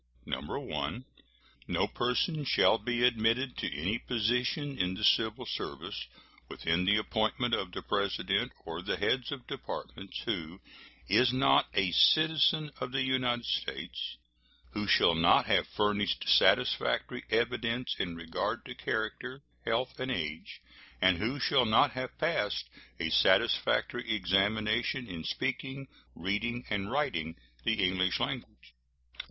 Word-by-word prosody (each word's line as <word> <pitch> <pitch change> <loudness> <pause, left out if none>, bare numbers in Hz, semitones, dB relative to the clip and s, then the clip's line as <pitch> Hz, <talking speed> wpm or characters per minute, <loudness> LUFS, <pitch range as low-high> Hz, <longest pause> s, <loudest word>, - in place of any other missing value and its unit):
1. 75 - -4 0.6
No - - +1
person 135 +6 -1
shall 115 -4 +4
be 120 -1 -1
admitted 120 +2 +1
to - - -3
any 90 +11 -2
position 125 +5 -1
in 90 -3 -1
the 110 - -6
civil 110 0 +3
service 65 0 -5 0.4
within 85 +2 -1
the 105 +2 +4
appointment 110 +3 0
of 95 -5 0
the - - -6
President 100 -1 0
or - - -5
the - - -2
heads 130 0 0
of 135 -4 -6
Departments 95 0 -7
who 90 -5 -3 0.5
is 125 0 +4
not 130 +2 +4
a 95 -2 +2
citizen 155 - +4
of 125 - -4
the 135 0 0
United 125 -2 0
States; - - -3 0.5
who 105 0 -3
shall 85 - +5
not 85 +1 +4
have - - +2
furnished 105 -2 0
satisfactory - - +3
evidence 120 +1 0
in 85 -2 -2
regard 85 -1 -3
to - - -7
character, 125 +5 -4 0.2
health, 125 +3 -1
and 130 +1 -3
age, 80 -8 -4 0.4
and 95 -2 +4
who 125 +8 -2
shall 125 -2 +3
not 115 +6 +4
have 130 0 -6
passed 105 - 0 0.3
a - - -1
satisfactory 120 -2 +2
examination 105 +6 +1
in 85 -3 -7
speaking, 135 - -3 0.3
reading, 115 +7 -2
and 100 -1 -1
writing 85 - -1 0.3
the 110 -4 +2
English 95 0 0
language. - - -5
110 Hz, 130 wpm, -30 LUFS, 95-130 Hz, 0.6 s, shall